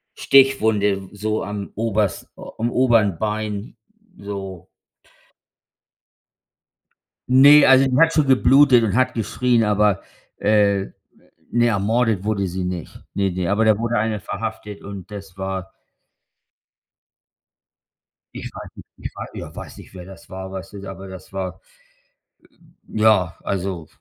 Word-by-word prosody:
Stichwunde 110 -8 +3
so 110 +1 -2
am 100 0 -6
oberst 105 -3 -1
am 115 +2 -5
oberen 115 -9 +3
Bein, 105 0 -4 0.4
so. 95 -3 -7 2.6
Ne, 140 +3 +8
also, 135 +1 +6
die 125 - +1
hat 165 0 +5
schon 155 -2 +2
geblutet 130 -1 +5
und 100 - -1
hat 130 +1 +2
geschrien, 120 +1 +1
aber, 105 -2 +2 0.4
äh, 100 -2 +2 0.7
ne, 120 0 +3
ermordet 110 -1 +1
wurde 100 -3 -1
sie 90 +1 -4
nicht. 90 -2 -6
Ne, 100 -2 0
ne. 90 0 -2
Aber 110 +2 +2
da 110 -2 +4
wurde 115 +1 -1
einer 110 -1 -1
verhaftet 105 0 -6
und 100 0 -9
das 95 -3 -9
war 95 0 -5 2.6
Ich - - -7
weiß - - -9
nicht, - - -13
ich - - -7
wei - - -6
ja, - - -9
weiß - - -9
nicht, - - -14
wer 90 -1 -10
das 95 -3 -14
war, 95 0 -7
weißt 95 +1 -8
du, 100 -1 -9
aber 95 0 -9
das 95 0 -11
war 95 -2 -5 1.3
ja, 105 -6 +2
also. 95 -4 -3
105 Hz, 130 wpm, -21 LUFS, 95-115 Hz, 2.6 s, Ne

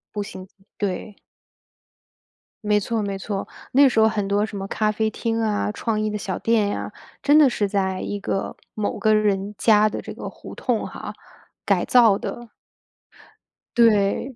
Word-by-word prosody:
步 205 - -1
行， - - -10 0.5
对。 200 +1 -3 1.5
没 210 0 +3
错， 225 +2 -2
没 200 -1 -3
错， 195 0 -4 0.3
那 280 +1 +7
时 235 -3 +1
候 220 - +6
很 205 -2 -2
多 205 +1 +1
什 215 -2 -4
么 195 0 -5
咖 215 +1 0
啡 220 +1 0
厅 225 +1 -2
啊、 210 -1 0
创 215 0 -2
意 215 - 0
的 210 - -3
小 195 -1 -4
店 225 -3 +2
呀， - - -4 0.3
真 290 +1 +5
的 300 - +7
是 210 -5 0
在 190 -2 -1
一 205 - -4
个 195 -1 -3 0.2
某 215 -1 -2
个 215 -1 +3
人 205 -1 +1
家 215 0 +4
的 - - -4
这 - - -8
个 - - -7
胡 - - -10
同 - - -1
哈， - - -8 0.5
改 - - +1
造 230 -5 +5
的。 240 -1 -7 1.3
对。 230 +2 +3
210 Hz, 185 characters per minute, -23 LUFS, 200-225 Hz, 1.5 s, 那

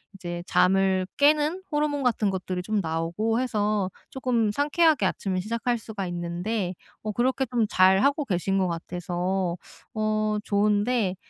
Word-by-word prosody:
이제 175 -2 -6
잠을 190 0 +3
깨는 300 +4 +3
호르몬 295 -1 0
같은 225 -5 +1
것들이 185 -1 -3
좀 215 +1 0
나오고 170 +8 -1
해서 210 -5 0 0.2
조금 240 -5 0
상쾌하게 300 +3 +3
아침을 185 -2 -1
시작할 230 +4 -1
수가 210 -4 -6
있는데 175 +3 -3 0.3
뭐 215 -1 -3
그렇게 260 +3 +1
좀 235 -3 0
잘하고 195 +11 +4
계신 195 -2 0
것 185 -1 +2
같아서 175 +1 -2 0.4
어 215 -1 0
좋은데 205 0 +1
210 Hz, 290 characters per minute, -26 LUFS, 185-245 Hz, 0.4 s, 잘하고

